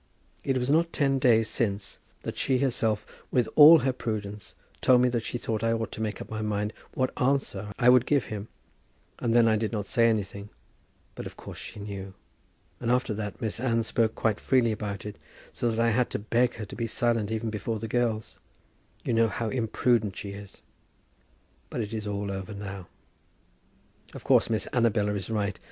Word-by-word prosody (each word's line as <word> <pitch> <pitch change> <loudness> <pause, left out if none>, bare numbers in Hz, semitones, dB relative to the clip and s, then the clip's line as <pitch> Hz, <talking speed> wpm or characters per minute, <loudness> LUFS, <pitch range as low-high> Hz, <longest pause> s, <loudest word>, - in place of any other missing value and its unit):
It 135 -1 +1
was 125 +2 0
not 165 +2 +3
ten 135 -2 +1
days 115 -3 +4
since 100 -3 -2 0.2
that - - -4
she 130 -1 +1
herself, 115 -5 0 0.2
with 125 -3 +2
all 155 +2 +10
her 130 - +2
prudence, 105 -4 -5 0.3
told 125 -1 +6
me 125 - +4
that 120 -2 -1
she 120 - -3
thought 110 -2 -3
I 115 0 +2
ought 115 -1 -2
to - - -6
make 110 -1 -2
up - - -7
my 110 0 -4
mind 105 0 -1 0.2
what 130 0 +1
answer 125 -7 0
I 120 - +2
would 125 -1 +6
give 145 -4 +3
him. 105 0 -6 0.7
And 115 -1 0
then 120 -1 +6
I 110 -1 +4
did 110 0 -1
not 105 -3 -2
say 115 +2 +3
anything; 100 -1 -2 0.6
but - - -6
of - - -12
course - - -9
she - - -8
knew. 100 -2 -7 0.6
And 120 - -2
after 125 -2 +2
that 105 -1 -5
Miss 110 0 -2
Anne 115 -2 +1
spoke 110 0 +1
quite 110 -3 0
freely 125 -4 +3
about 105 -2 -4
it, 105 - -6 0.4
so 120 - 0
that 115 0 -2
I 115 0 +3
had 125 +2 +1
to - - -2
beg 120 +4 +1
her 110 - -5
to - - -10
be 115 -1 -2
silent 115 -1 +1
even 110 0 -2
before 110 +1 -3
the 115 +1 -5
girls. 110 -2 -1 0.7
You - - 0
know 115 0 +4
how 110 0 -3
imprudent 115 -3 +1
she 100 - -5
is. 100 0 -11 1.1
But - - -3
it 105 0 -5
is 110 -1 -4
all 100 -1 -2
over 95 +2 -5
now. 100 -3 -7 1.3
Of - - -8
course - - +4
Miss 110 -3 -1
Annabella 110 -4 +2
is 100 -1 -4
right. 105 -2 -1
110 Hz, 200 wpm, -27 LUFS, 105-120 Hz, 1.3 s, all